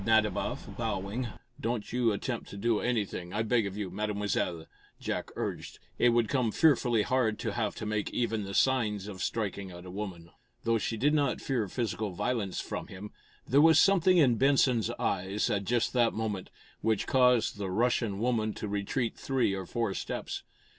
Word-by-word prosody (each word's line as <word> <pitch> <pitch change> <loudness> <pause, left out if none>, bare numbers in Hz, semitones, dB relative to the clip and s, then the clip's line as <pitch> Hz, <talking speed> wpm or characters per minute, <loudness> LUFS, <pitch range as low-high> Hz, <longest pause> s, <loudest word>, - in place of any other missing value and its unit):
Nadiboff, 110 -2 +1
bowing. 100 +6 -2 0.3
"Don't 115 -2 -3
you 120 -2 +3
attempt 115 +4 -3
to 100 - -8
do 115 +1 +1
anything, 100 -7 -2
I 110 - 0
beg 115 -2 +2
of 100 +1 -6
you, 100 -4 -3
Mademoiselle," 100 -4 -1 0.3
Jack - - -3
urged. - - -4 0.2
"It 120 - +5
would 120 -1 +3
come 125 -2 +1
fearfully 120 -8 +3
hard 120 -4 +1
to 110 - -3
have 110 0 -2
to - - -5
make 105 -1 -1
even 115 -3 -1
the 100 0 -5
signs 110 -7 +2
of 95 -3 -7
striking 100 -3 -2
at 90 0 -10
a 90 - -8
woman." 90 -4 -6 0.3
Though 115 0 +2
she 115 - -2
did 145 +7 +2
not 145 -4 +1
fear 120 -6 -1
physical 110 0 -2
violence 105 0 -1
from - - -5
him, 100 +2 -9 0.4
there 140 +3 +5
was 160 -1 +7
something 185 +1 +5
in 130 -8 +5
Benson's 130 -4 +3
eyes, 95 +2 0
at 100 -1 0
just 120 +3 +1
that 120 -2 +3
moment, 105 -4 -3 0.3
which 110 -2 +1
caused 125 -4 +3
the 100 -2 -3
Russian 115 0 +1
woman 110 -1 0
to 105 - -4
retreat 105 +4 -1
three 130 -7 0
or 95 -2 -4
four 115 -4 -1
steps. - - -4
110 Hz, 180 wpm, -30 LUFS, 100-125 Hz, 0.4 s, was